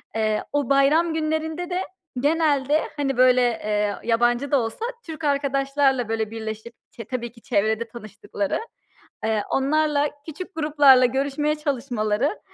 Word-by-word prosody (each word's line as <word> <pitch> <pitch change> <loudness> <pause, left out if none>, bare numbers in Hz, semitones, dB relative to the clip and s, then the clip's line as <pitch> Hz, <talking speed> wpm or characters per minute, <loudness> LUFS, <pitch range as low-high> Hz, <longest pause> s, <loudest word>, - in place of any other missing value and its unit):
Eee, 215 -1 0
o 290 -4 0
bayram 295 +5 +3
günlerinde 320 +2 -2
de 360 +1 -1 0.4
genelde, 295 0 +2 0.2
hani, 270 -3 -1
böyle, 255 0 +5
eee, 210 -4 0
yabancı 240 +3 +1
da 280 - +4
olsa 230 - -3 0.2
Türk 320 -1 -8
arkadaşlarla 275 -3 +1
böyle 220 -1 -2
birleşip 220 +1 -6 0.2
çe 230 - -9
tabii 240 0 -4
ki 230 0 -19
çevrede 220 +1 0
tanıştıkları, 210 -3 -4 0.7
eee, 220 -1 +1
onlarla, 295 +1 +1 0.2
küçük 370 +5 -7
gruplarla 290 -5 +5
görüşmeye 280 +4 0
çalışmaları, 260 - -1
270 Hz, 130 wpm, -23 LUFS, 230-300 Hz, 0.7 s, böyle